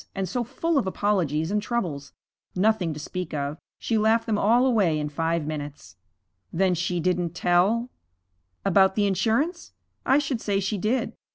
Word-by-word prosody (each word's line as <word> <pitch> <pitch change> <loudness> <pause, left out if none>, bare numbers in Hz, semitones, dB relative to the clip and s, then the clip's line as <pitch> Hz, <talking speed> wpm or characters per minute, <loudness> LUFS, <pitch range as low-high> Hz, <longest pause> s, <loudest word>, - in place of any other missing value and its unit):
And 195 -1 -2
so 245 +7 -2
full 330 +6 0
of 230 - -2
apologies 180 -5 0
and 210 0 +1
troubles! 170 - -3 0.4
Nothing 195 -3 +2
to - - -7
speak 175 +1 -5
of 145 +1 -3 0.2
she 225 -2 0
laughed 220 +2 +3
them 210 -2 0
all 235 +5 +4
away 205 -11 +2
in 150 -1 -2
five 165 +1 -1
minutes.' 145 - -7 0.6
'Then 185 +1 +2
she 175 +1 -1
didn't 175 0 -1
tell 185 +8 +2 0.4
' 90 0 -47
'About 190 0 +4
the 210 - +2
insurance? 225 - 0 0.3
I 265 - +4
should 275 -5 -1
say 200 -1 0
she 195 +1 -2
did. 225 +7 -1
190 Hz, 170 wpm, -25 LUFS, 160-220 Hz, 0.6 s, all